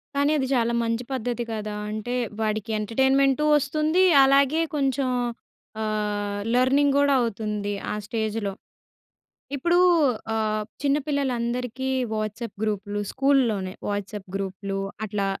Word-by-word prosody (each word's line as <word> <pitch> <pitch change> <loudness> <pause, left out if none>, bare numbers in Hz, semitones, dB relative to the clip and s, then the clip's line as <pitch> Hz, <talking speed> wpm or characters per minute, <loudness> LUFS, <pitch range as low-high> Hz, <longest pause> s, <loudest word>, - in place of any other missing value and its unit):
కానీ 285 +1 +2
అది 265 -2 0
చాలా 235 -1 +1
మంచి 230 +1 -1
పద్ధతి 245 -1 -2
కదా! 215 -1 -4 0.2
అంటే 215 +3 -4 0.3
వాడికి 215 0 -1
ఎంటర్‌టైన్‌మెంటూ 265 +5 +2
వస్తుంది, 305 +5 +1 0.2
అలాగే 280 +3 +4
కొంచెం 270 -2 +1 0.7
ఆహ్, 205 -1 -2
లెర్నింగ్ 275 +3 +3
కూడా 285 0 +4
అవుతుంది. 210 -2 -2 0.2
ఆ - - -1
స్టేజ్‌లో. 215 -2 -2 1.0
ఇప్పుడూ 345 +6 +2 0.6
ఆహ్, 215 -1 0 0.2
చిన్నపిల్లలందరికీ 265 -3 -1 0.3
వాట్సాప్ 215 +1 -4
గ్రూప్‌లు, 205 -1 -2
స్కూల్‌లోనే 245 -9 +2 0.2
వాట్సాప్ 205 -1 -4
గ్రూప్‌లూ, 195 0 -3 0.3
అట్లా 200 -1 -1
230 Hz, 105 wpm, -25 LUFS, 210-270 Hz, 1.0 s, అలాగే